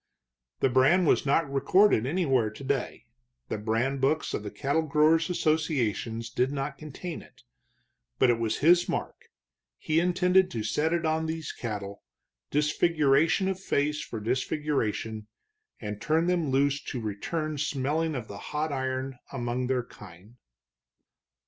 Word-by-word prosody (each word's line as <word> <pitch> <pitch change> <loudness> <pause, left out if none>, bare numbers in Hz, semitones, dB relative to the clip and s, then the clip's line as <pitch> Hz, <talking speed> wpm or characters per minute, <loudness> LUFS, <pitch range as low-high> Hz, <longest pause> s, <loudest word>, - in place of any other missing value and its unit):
The 135 - +4
brand 135 +9 +4
was 145 - +2
not 150 +3 +3
recorded 140 - +3
anywhere 135 -8 +1
today; 135 +3 -3 0.4
the 110 - -3
brand 115 +6 -1
books 155 +4 +1
of - - -2
the 105 - -6
cattle 140 +8 0
growers' 160 +2 +3
associations 130 - -1
did 125 +2 +1
not 140 0 -4
contain 155 +3 -7
it. - - -19 0.7
But 125 - +5
it 115 - 0
was 115 -1 -1
his 175 +1 +5
mark; - - -4 0.5
he 155 +1 +1
intended 180 +1 +3
to 115 -2 -4
set 150 +8 0
it 170 -1 0
on 160 0 0
these 160 0 -4
cattle, 100 -4 -6 0.5
disfiguration 150 +3 +2
of 190 -1 -2
face 150 -4 0
for 115 - -6
disfiguration, 115 -3 -2 0.5
and 105 -1 -6
turn 160 +8 +2
them 175 -4 +1
loose 140 +1 +2
to 130 - -4
return 150 +9 -3
smelling 150 +3 -1
of 120 -4 -5
the 100 0 -8
hot 150 +6 -3
iron 130 -1 -3
among 125 -1 -2
their 130 -1 0
kind. 100 +1 -15
140 Hz, 140 wpm, -28 LUFS, 120-160 Hz, 0.7 s, But